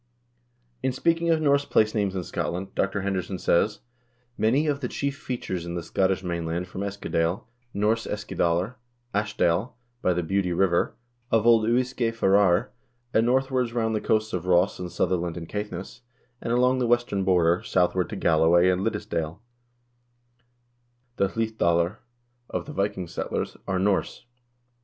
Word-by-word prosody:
In 130 Hz, -, +1 dB
speaking 165 Hz, +5 st, +1 dB
of 160 Hz, -1 st, +3 dB
Norse 140 Hz, -1 st, +4 dB
place 110 Hz, -5 st, +2 dB
names 100 Hz, -3 st, 0 dB
in 90 Hz, -, -2 dB
Scotland, 90 Hz, +3 st, -4 dB
Dr. 100 Hz, +1 st, 0 dB
Henderson 95 Hz, -1 st, -2 dB
says:2 100 Hz, +5 st, +1 dB, 0.6 s
"Many 130 Hz, +8 st, +2 dB
of 145 Hz, -2 st, 0 dB
the 130 Hz, -, -2 dB
chief 140 Hz, +2 st, -2 dB
features 105 Hz, -, -4 dB
in 85 Hz, 0 st, -5 dB
the 85 Hz, -, -3 dB
Scottish 95 Hz, +1 st, 0 dB
mainland, 85 Hz, 0 st, -2 dB
from 90 Hz, +2 st, -6 dB
Eskadale, 100 Hz, -3 st, -1 dB, 0.3 s
Norse 110 Hz, +3 st, 0 dB
Eskidalr, 100 Hz, +1 st, -1 dB, 0.4 s
'Ash 105 Hz, +1 st, -1 dB
dale,' 85 Hz, +8 st, +1 dB, 0.3 s
by 90 Hz, -, +2 dB
the 90 Hz, 0 st, -1 dB
Beauly 90 Hz, 0 st, 0 dB
River, 90 Hz, -2 st, +2 dB, 0.3 s
of 115 Hz, -1 st, +2 dB
old 115 Hz, -1 st, +5 dB
Uisge 120 Hz, -1 st, 0 dB
Farrar, 100 Hz, 0 st, +3 dB, 0.4 s
and 115 Hz, +1 st, +3 dB
northwards 130 Hz, -1 st, +1 dB
round 110 Hz, -2 st, 0 dB
the 110 Hz, -, -1 dB
coasts 110 Hz, 0 st, 0 dB
of 90 Hz, -1 st, -3 dB
Ross 90 Hz, +2 st, +3 dB
and 90 Hz, -1 st, -5 dB
Sutherland 90 Hz, -1 st, -1 dB
and 85 Hz, -2 st, -6 dB
Caithness, 105 Hz, +3 st, -6 dB, 0.4 s
and -, -, -3 dB
along 125 Hz, +2 st, +3 dB
the 125 Hz, -, +1 dB
western 120 Hz, -5 st, +1 dB
border, 90 Hz, -2 st, +3 dB
southward 90 Hz, 0 st, +1 dB
to 110 Hz, -, -5 dB
Galloway 85 Hz, 0 st, +4 dB
and 90 Hz, 0 st, +1 dB
Liddesdale, 85 Hz, -6 st, -2 dB, 1.8 s
the 100 Hz, -, +3 dB
Hlid 110 Hz, +2 st, -3 dB
dalr 85 Hz, +4 st, +2 dB, 0.5 s
of -, -, -3 dB
the 150 Hz, -, -8 dB
Viking 100 Hz, -4 st, -1 dB
settlers, 85 Hz, -, -3 dB
are 95 Hz, -, 0 dB
Norse. 95 Hz, +4 st, 0 dB
100 Hz, 155 wpm, -26 LUFS, 90-115 Hz, 1.8 s, old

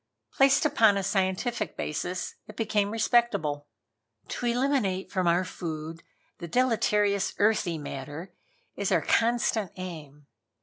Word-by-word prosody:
Placed 270 Hz, +2 st, +4 dB
upon 220 Hz, -8 st, +4 dB
a 195 Hz, -, -1 dB
scientific 195 Hz, +4 st, -1 dB
basis 175 Hz, +4 st, -3 dB
it 215 Hz, -, -11 dB
became 210 Hz, -2 st, 0 dB
respectable. 210 Hz, -10 st, +1 dB, 0.6 s
"To 245 Hz, -, -3 dB
eliminate 235 Hz, -7 st, 0 dB
from 185 Hz, -3 st, 0 dB
our 175 Hz, +2 st, +3 dB
food 165 Hz, -2 st, -6 dB, 0.4 s
the 170 Hz, -, -6 dB
deleterious 210 Hz, -2 st, +1 dB
earthy 205 Hz, -5 st, +2 dB
matter 145 Hz, +5 st, -7 dB, 0.4 s
is -, -, -2 dB
our -, -, +3 dB
constant 230 Hz, -4 st, +1 dB
aim. 155 Hz, -6 st, -8 dB
195 Hz, 120 wpm, -27 LUFS, 170-225 Hz, 0.6 s, Placed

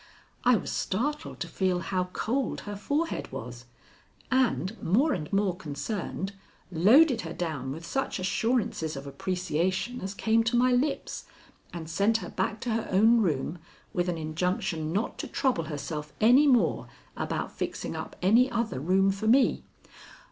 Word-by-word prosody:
I 250 Hz, 0 st, +5 dB
was 200 Hz, -, -3 dB
startled 290 Hz, +10 st, -2 dB
to 175 Hz, -, -2 dB
feel 185 Hz, +2 st, 0 dB
how 185 Hz, 0 st, -1 dB
cold 240 Hz, +8 st, -2 dB
her 205 Hz, 0 st, -6 dB
forehead 290 Hz, +11 st, -2 dB
was, -, -, -7 dB, 0.7 s
and, 245 Hz, -6 st, +1 dB
more 260 Hz, -, +3 dB
and 150 Hz, -3 st, -4 dB
more 195 Hz, -2 st, +1 dB
concerned, 190 Hz, +4 st, -4 dB, 0.4 s
loaded 230 Hz, -, +5 dB
her 165 Hz, -1 st, -6 dB
down 155 Hz, -7 st, -3 dB
with 160 Hz, +4 st, -7 dB
such 270 Hz, +10 st, -2 dB
assurances 195 Hz, -4 st, 0 dB
of 135 Hz, +1 st, -7 dB
appreciation 185 Hz, -, -2 dB
as 190 Hz, +1 st, -5 dB
came 225 Hz, +2 st, +2 dB
to 230 Hz, +2 st, +1 dB
my 255 Hz, +1 st, +4 dB
lips, 265 Hz, +4 st, -1 dB, 0.5 s
and 165 Hz, -2 st, -6 dB
sent 200 Hz, +7 st, +2 dB
her 180 Hz, -5 st, -7 dB
back 190 Hz, +3 st, -2 dB
to 245 Hz, -, -2 dB
her 225 Hz, 0 st, -1 dB
own 225 Hz, +5 st, +5 dB
room 160 Hz, -2 st, -1 dB, 0.3 s
with 180 Hz, 0 st, 0 dB
an 170 Hz, -, -1 dB
injunction 160 Hz, 0 st, -2 dB
not 205 Hz, +7 st, -2 dB
to -, -, -3 dB
trouble 250 Hz, -, 0 dB
herself 150 Hz, 0 st, -5 dB
any 250 Hz, +7 st, +6 dB
more 250 Hz, -4 st, +3 dB, 0.3 s
about -, -, -3 dB
fixing -, -, -4 dB
up -, -, -6 dB
any 235 Hz, +7 st, +5 dB
other 230 Hz, -, -1 dB
room 190 Hz, +6 st, +3 dB
for 195 Hz, +3 st, -3 dB
me. 255 Hz, +4 st, +4 dB
195 Hz, 155 wpm, -28 LUFS, 170-235 Hz, 0.7 s, any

